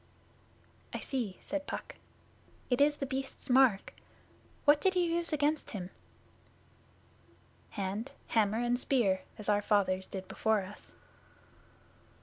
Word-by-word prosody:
'I - - -2
see,' 230 -9 -3
said 290 0 -3
Puck. - - -5 0.8
'It 245 - +3
is 295 +1 +5
The 285 - -3
Beast's 270 -1 -4
mark. 250 -6 +4 0.7
What 290 0 +6
did 380 -1 +2
you 360 - +3
use 340 0 0
against 300 0 +1
him?' 185 -4 -6 1.8
'Hand, 205 +5 -4 0.2
hammer, 215 -1 +2
and 240 +1 +1
spear, 215 -9 +2 0.2
as 210 - -5
our 205 -1 +3
fathers 190 -3 +1
did 190 -1 -6
before 220 -2 +1
us. 195 +2 -10
240 Hz, 125 wpm, -32 LUFS, 200-285 Hz, 1.8 s, What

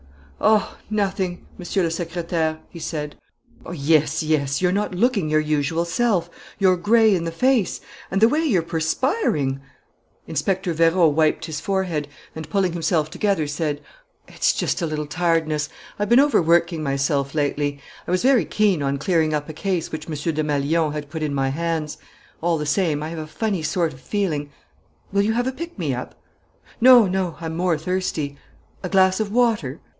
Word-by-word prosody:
"Oh, 215 -1 +2
nothing, 195 -4 -2
Monsieur 185 +2 -1
le 165 - +1
Secrétaire!" 165 -1 -2
he 170 - -9
said. 150 -2 -4 0.6
"Yes, 155 -1 +2
yes; 145 -3 0
you're 180 -1 +2
not 200 -1 -1
looking 205 -5 +1
your 155 0 +3
usual 155 +2 0
self. 210 -1 0 0.3
You're 185 -2 +3
gray 220 +3 +4
in 170 -3 0
the 165 - -2
face.... 250 +3 +1 0.3
And 195 - 0
the 220 - +7
way 305 +7 +1
you're 205 - +2
perspiring...." 160 - 0 0.6
Inspector 175 +3 -1
Vérot 165 0 +4
wiped 155 +1 +2
his 155 -3 -4
forehead 185 -7 -1 0.3
and, 160 -1 -7
pulling 190 -4 +1
himself 160 -2 0
together, 200 -7 0
said: 145 0 -2 0.5
"It's - - +1
just - - -1
a 170 - 0
little 155 -1 -3
tiredness.... 160 -1 0 0.3
I've 205 - -1
been 240 +2 +6
overworking 170 - +3
myself 140 0 -1
lately: 145 -1 -1 0.3
I - - -2
was 180 +3 +1
very 260 -3 +4
keen 205 -7 +1
on 140 0 0
clearing 155 0 +1
up 150 -1 -3
a 155 - -7
case 175 0 -2
which 155 -1 -6
Monsieur 155 +2 -2
Desmalions 150 +1 0
had 145 -1 -6
put 160 -1 -5
in 150 -2 -1
my 135 -1 +1
hands. 160 +1 -2 0.4
All 170 0 +1
the 150 - -3
same, 150 -1 0
I 155 - -4
have 165 0 -6
a 155 - -6
funny 195 +3 -2
sort 160 0 0
of 130 - -15
feeling 160 -9 -2 0.3
" - - -37
"Will 200 0 +2
you 215 +2 +1
have 245 +2 0
a 260 - 0
pick 335 +5 -8
me - - -1
up?" - - -7 0.6
"No, 245 -2 +8
no; 185 -2 -2
I'm 160 -1 -5
more 175 -1 +1
thirsty." 160 -4 -2 0.5
"A 185 - -4
glass 190 0 +4
of 215 -2 -2
water?" 215 - +1
165 Hz, 180 wpm, -22 LUFS, 155-195 Hz, 0.6 s, No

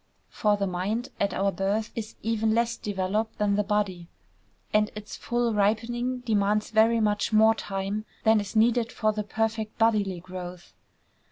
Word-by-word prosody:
For 210 -1 +1
the 200 - 0
mind, 195 +7 -2
at 200 - +1
our 195 +1 +1
birth, 205 +3 -1
is 220 -1 -5
even 220 0 +1
less 235 0 +1
developed 205 +2 -2
than 205 -1 +1
the 210 - +2
body; 195 -4 -1 0.7
and 210 0 +3
its 210 0 -7
full 240 -1 -1
ripening 240 +5 0
demands 210 -2 +1
very 225 +1 +4
much 210 0 +1
more 220 +1 +6
time 200 0 -4 0.2
than 220 -1 +5
is 205 +1 -6
needed 230 +1 +3
for 215 -3 0
the 210 - -2
perfect 220 +1 -2
bodily 210 -5 +2
growth. 180 0 -9
215 Hz, 160 wpm, -27 LUFS, 200-225 Hz, 0.7 s, more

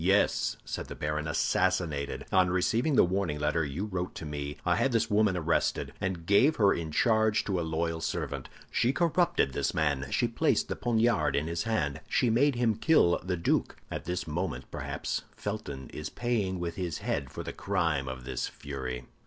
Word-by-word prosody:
"Yes," 95 +3 +2
said - - -4
the - - -7
baron, 75 +1 -2
"assassinated. 80 -2 0
On 95 -1 +4
receiving 115 - +1
the - - +7
warning 90 -4 0
letter 75 +2 +1
you 75 +7 -3
wrote 90 -3 -4
to 80 - -6
me, 75 -1 -4
I 90 -1 +3
had 135 - +1
this 115 -1 +1
woman 105 -3 +3
arrested, 85 -1 0
and 90 -3 -2
gave 125 - +5
her 100 -3 +4
in 80 -2 -3
charge 110 +5 +3
to 95 -3 -1
a - - 0
loyal 80 0 -1
servant. 80 - -3 0.2
She 125 +3 +2
corrupted 170 - +2
this - - -1
man; 70 -4 +1
she - - +2
placed - - +1
the - - -1
poniard 115 -1 +2
in 70 - +1
his 85 +1 -2
hand; 85 -12 -1
she 120 - +2
made 135 +4 +3
him 115 -3 +1
kill 110 - +4
the 90 -1 -1
duke. 85 - +1 0.2
And - - -1
at - - -18
this 90 +2 -2
moment, 75 -6 -3
perhaps, - - -3
Felton 70 -11 -5
is 75 0 -5
paying 105 -7 -1
with 85 -1 -4
his 90 -4 -2
head 70 -2 -2
for - - -6
the - - -5
crime 75 -5 0
of 65 -1 -5
this 65 -1 -2
fury!" 65 -3 -6
90 Hz, 195 wpm, -29 LUFS, 75-110 Hz, 0.2 s, the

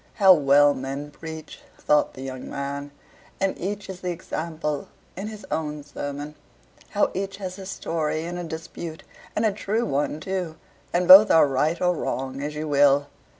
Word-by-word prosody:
"How 195 -3 +8
well 145 -2 +5
men 135 +2 -5
preach," 160 +1 -9 0.2
thought 150 0 +2
the 130 - -7
young 130 -1 -6
man, 140 +1 -4 0.5
"and 195 -1 +1
each 205 +2 -4
is 190 -1 -8
the 180 - -2
example 160 -3 -4 0.3
in 195 +3 -5
his 215 -2 -8
own 150 -2 -2
sermon. 145 +1 -6 0.6
How - - +1
each 195 +1 -3
has 190 -1 -6
a 190 - -8
story 160 -4 -2
in 175 +1 -5
a - - -4
dispute, 160 0 -7 0.3
and 220 - +1
a 215 - +3
true 215 +3 -1
one, 145 -3 -1
too, 180 -3 -3 0.4
and 175 0 +1
both 195 +3 +11
are 160 - +6
right 150 +5 +1
or 180 0 +2
wrong 135 -2 -3
as 150 +1 -4
you 155 +1 -3
will!" 145 0 +4
160 Hz, 175 wpm, -24 LUFS, 145-185 Hz, 0.6 s, both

